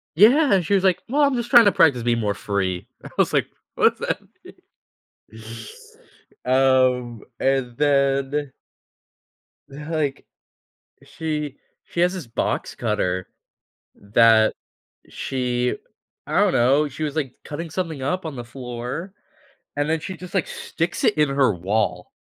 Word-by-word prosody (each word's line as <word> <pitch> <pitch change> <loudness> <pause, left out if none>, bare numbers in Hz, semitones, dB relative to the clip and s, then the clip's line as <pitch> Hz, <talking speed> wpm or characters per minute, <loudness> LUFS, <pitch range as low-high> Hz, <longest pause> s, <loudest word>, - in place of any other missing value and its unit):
Yeah, 245 - +6
and 180 -4 +2
she 200 - +2
was 190 - +2
like, 185 -3 +2
"Well, 290 +3 +2
I'm 280 -2 +3
just 240 -1 -3
trying 240 -4 +8
to 205 - +6
practice 140 -9 +3
being 120 -1 +1
more 105 -2 0
free." 95 -1 -2 0.2
I - - -9
was - - +2
like, - - +2 0.3
"What's - - +3
that - - -2 0.2
mean?" - - -13 1.9
Um, 130 -3 +2 0.2
and 135 -3 0
then 140 -1 +1 1.2
like, 150 0 -3 0.8
she 150 -3 -4 0.3
she 170 - -4
has 180 +2 +3
this 175 -9 -6
box 115 - -2
cutter 90 0 -1 0.7
that 110 +1 +4 0.5
she 125 -2 -2 0.5
I - - +1
don't - - +3
know, 135 +5 +3
she 145 +3 -8
was, 150 0 -4
like, 135 -5 -2
cutting 160 +2 -6
something 160 -5 -4
up 180 +7 -1
on 150 - -6
the 120 - -6
floor, 125 +8 -6 0.6
and 145 +1 0
then 160 0 +1
she 190 +4 -6
just, 180 0 -11
like, 190 -4 0
sticks 170 +2 -4
it - - +3
in 150 -2 +3
her 135 -5 +2
wall. 90 0 -1
140 Hz, 145 wpm, -22 LUFS, 120-165 Hz, 1.9 s, trying